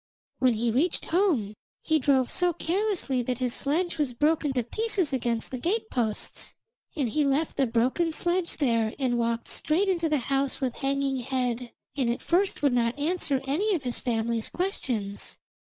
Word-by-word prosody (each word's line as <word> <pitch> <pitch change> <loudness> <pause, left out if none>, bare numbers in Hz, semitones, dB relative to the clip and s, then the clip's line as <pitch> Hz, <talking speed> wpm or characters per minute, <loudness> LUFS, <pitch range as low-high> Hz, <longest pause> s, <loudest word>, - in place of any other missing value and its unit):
When 255 -2 +4
he 230 +1 0
reached 310 +9 +1
home 320 - +1 0.3
he 315 0 +2
drove 265 -2 +2
so 355 -1 +3
carelessly 345 - 0
that 245 0 -2
his 250 -1 0
sledge 330 +4 -1
was 265 -5 0
broken 300 +2 +2
to 250 -2 0
pieces 380 - -1
against 235 -3 -1
the 255 - -4
gate 435 - -1
posts, 220 -4 -2 0.4
and 285 -6 0
he 295 +7 +1
left 285 +3 +1
the 270 - +2
broken 255 +9 +1
sledge 345 +2 0
there 230 -6 +1
and 250 -3 0
walked 230 0 -1
straight 345 +6 +1
into 340 -4 +1
the 305 - +2 0.2
house 275 0 +1
with 255 -3 -2
hanging 275 -1 0
head, 250 -1 -2 0.2
and 260 -4 +1
at 235 - -2
first 365 -2 +1
would 280 -3 +4
not 235 +1 +1
answer 290 -3 0
any 380 +10 +1
of 305 - -3
his 245 -2 -2
family's 230 -1 -1
questions. 240 - -3
275 Hz, 175 wpm, -27 LUFS, 240-330 Hz, 0.4 s, When